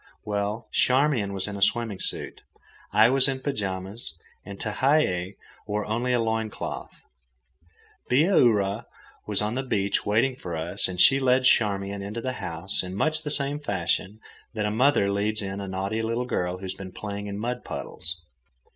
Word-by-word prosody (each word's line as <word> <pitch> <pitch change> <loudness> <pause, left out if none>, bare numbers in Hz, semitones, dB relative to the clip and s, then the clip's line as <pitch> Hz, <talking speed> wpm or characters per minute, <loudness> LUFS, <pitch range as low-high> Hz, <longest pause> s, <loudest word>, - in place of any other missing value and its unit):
Well, 105 +2 -2
Charmian 130 -6 +2
was 95 0 -3
in 100 - -5
a 100 - -6
swimming 110 -1 +2
suit, - - -4 0.5
I 110 +2 +6
was 135 0 +5
in 135 -1 0
pyjamas, 95 - -3 0.3
and 100 -1 -8
Tehei 105 - +1 0.3
wore 105 0 -1
only 120 +4 -1
a 125 - +3
loin 110 -1 0
cloth. - - -7 1.1
Bihaura 120 - +3 0.4
was 105 -1 +1
on 105 +2 -1
the 130 - -1
beach 100 -6 0
waiting 115 +5 +2
for 85 -8 -5
us, 80 +2 +1
and 90 -1 -5
she 135 +8 +7
led 130 -1 +3
Charmian 100 -4 +2
into 105 +4 -5
the 130 +2 -3
house 85 +3 -2
in 95 0 -6
much 155 +8 +1
the 155 - -4
same 145 0 +1
fashion 100 - -2 0.4
that 110 - -1
the 105 - 0
mother 115 -3 +3
leads 105 +2 0
in 95 0 -4
the 100 - -5
naughty 95 +4 -2
little 115 +2 -1
girl 90 -6 -1
who 95 - -13
has 95 - -2
been 95 -1 -9
playing 100 +1 -5
in 100 0 -4
mud 120 +3 -3
puddles. 85 -1 -5
105 Hz, 175 wpm, -26 LUFS, 100-125 Hz, 1.1 s, she